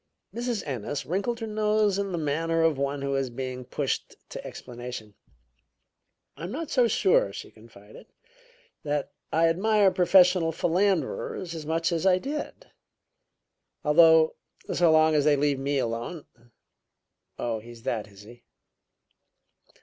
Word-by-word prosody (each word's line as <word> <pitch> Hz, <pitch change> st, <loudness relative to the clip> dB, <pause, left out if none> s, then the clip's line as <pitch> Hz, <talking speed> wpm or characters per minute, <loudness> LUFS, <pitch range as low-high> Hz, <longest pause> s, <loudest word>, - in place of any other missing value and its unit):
Mrs. 240 Hz, -2 st, -3 dB
Ennis 140 Hz, +1 st, -4 dB
wrinkled 200 Hz, +7 st, -2 dB
her -, -, -2 dB
nose 210 Hz, -2 st, +1 dB
in 200 Hz, -1 st, -2 dB
the 175 Hz, -, -2 dB
manner 165 Hz, +2 st, 0 dB
of 165 Hz, -2 st, +3 dB
one 140 Hz, 0 st, -2 dB
who 140 Hz, 0 st, -1 dB
is 135 Hz, -1 st, -1 dB
being 125 Hz, +1 st, -5 dB
pushed -, -, -3 dB
to -, -, -7 dB
explanation. 120 Hz, -3 st, -8 dB, 1.2 s
"I -, -, -7 dB
am 180 Hz, -, -6 dB
not 315 Hz, +4 st, -5 dB
so 250 Hz, -3 st, +4 dB
sure," 185 Hz, -, +2 dB
she 100 Hz, -, -9 dB
confided, 110 Hz, -2 st, -16 dB, 0.7 s
"that 145 Hz, -1 st, -2 dB, 0.2 s
I 165 Hz, +1 st, +3 dB
admire 200 Hz, +3 st, +3 dB
professional 180 Hz, -2 st, +4 dB
philanderers 180 Hz, 0 st, -1 dB
as 155 Hz, -2 st, -7 dB
much 165 Hz, +2 st, 0 dB
as 170 Hz, +2 st, 0 dB
I 185 Hz, -1 st, +5 dB
did. 290 Hz, +9 st, -6 dB, 1.1 s
Although, 160 Hz, +1 st, +6 dB, 0.4 s
so 175 Hz, -2 st, +4 dB
long 155 Hz, 0 st, +5 dB
as 150 Hz, -2 st, +3 dB
they 150 Hz, 0 st, +4 dB
leave 140 Hz, -1 st, +1 dB
me 140 Hz, +1 st, -1 dB
alone 120 Hz, +6 st, -3 dB, 0.6 s
" -, -, -57 dB, 0.3 s
"Oh, 115 Hz, -2 st, -2 dB
he's 115 Hz, +1 st, -13 dB
that, 115 Hz, -5 st, -2 dB
is 100 Hz, 0 st, -15 dB
he?" 120 Hz, +3 st, -15 dB
160 Hz, 140 wpm, -26 LUFS, 130-185 Hz, 1.2 s, Although